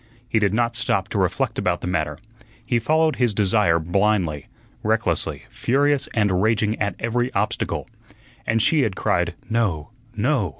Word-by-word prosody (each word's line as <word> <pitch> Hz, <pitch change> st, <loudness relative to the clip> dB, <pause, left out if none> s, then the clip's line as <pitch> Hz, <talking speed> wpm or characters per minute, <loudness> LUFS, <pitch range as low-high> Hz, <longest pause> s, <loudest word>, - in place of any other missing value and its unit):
He 110 Hz, -, +1 dB
did 100 Hz, -2 st, +2 dB
not 120 Hz, +2 st, 0 dB
stop -, -, 0 dB
to -, -, -1 dB
reflect -, -, 0 dB
about 90 Hz, -1 st, 0 dB
the -, -, -5 dB
matter; 75 Hz, -5 st, -1 dB, 0.5 s
he 120 Hz, -1 st, +1 dB
followed 155 Hz, +6 st, +2 dB
his 120 Hz, -5 st, +1 dB
desire 100 Hz, -4 st, +3 dB
blindly, 85 Hz, -3 st, 0 dB, 0.3 s
recklessly, -, -, 0 dB
furious 140 Hz, +2 st, +1 dB
and 100 Hz, -5 st, +2 dB
raging 110 Hz, 0 st, +2 dB
at 100 Hz, -3 st, 0 dB
every 120 Hz, +2 st, -1 dB
obstacle. 105 Hz, +2 st, -1 dB, 0.6 s
And 115 Hz, -1 st, +2 dB
she 155 Hz, -3 st, +3 dB
had 110 Hz, -7 st, 0 dB
cried -, -, 0 dB
"No, 105 Hz, -7 st, -1 dB, 0.2 s
no!" 115 Hz, -, +1 dB
110 Hz, 155 wpm, -22 LUFS, 95-120 Hz, 0.6 s, desire